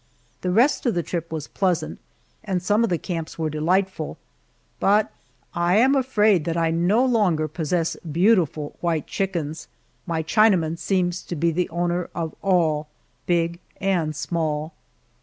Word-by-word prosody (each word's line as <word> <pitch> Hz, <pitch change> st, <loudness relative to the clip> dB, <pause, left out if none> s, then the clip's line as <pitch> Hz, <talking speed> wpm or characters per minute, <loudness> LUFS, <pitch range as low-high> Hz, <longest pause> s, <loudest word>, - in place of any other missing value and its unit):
The 180 Hz, -, -1 dB
rest 240 Hz, +8 st, +3 dB
of 235 Hz, -, +1 dB
the 175 Hz, -, 0 dB
trip 170 Hz, -1 st, -4 dB
was 155 Hz, -2 st, -4 dB
pleasant, 185 Hz, -4 st, -1 dB, 0.4 s
and 190 Hz, -4 st, -1 dB
some 210 Hz, +5 st, +2 dB
of 230 Hz, -, +1 dB
the 175 Hz, -, +1 dB
camps 165 Hz, -2 st, -5 dB
were 160 Hz, -2 st, -1 dB
delightful, 170 Hz, +2 st, 0 dB, 0.6 s
but 210 Hz, +2 st, +3 dB, 0.4 s
I 175 Hz, +1 st, +2 dB
am 260 Hz, +5 st, +5 dB
afraid 215 Hz, -, +3 dB
that 165 Hz, 0 st, -1 dB
I 165 Hz, -1 st, +2 dB
no 180 Hz, +9 st, +3 dB
longer 195 Hz, -11 st, +2 dB
possess 165 Hz, +2 st, -1 dB
beautiful 165 Hz, -3 st, +1 dB
white 165 Hz, -4 st, 0 dB
chickens 170 Hz, -5 st, -3 dB, 0.4 s
my 165 Hz, -2 st, -1 dB
Chinaman 170 Hz, -3 st, +3 dB
seems 180 Hz, -1 st, 0 dB
to 175 Hz, -, -6 dB
be 170 Hz, +2 st, +1 dB
the 175 Hz, +2 st, -1 dB
owner 175 Hz, +1 st, -1 dB
of 165 Hz, -2 st, -3 dB
all, 160 Hz, -6 st, +2 dB, 0.4 s
big 170 Hz, -1 st, +1 dB, 0.2 s
and 175 Hz, -6 st, 0 dB
small. 155 Hz, -1 st, -2 dB
175 Hz, 150 wpm, -23 LUFS, 160-195 Hz, 0.6 s, am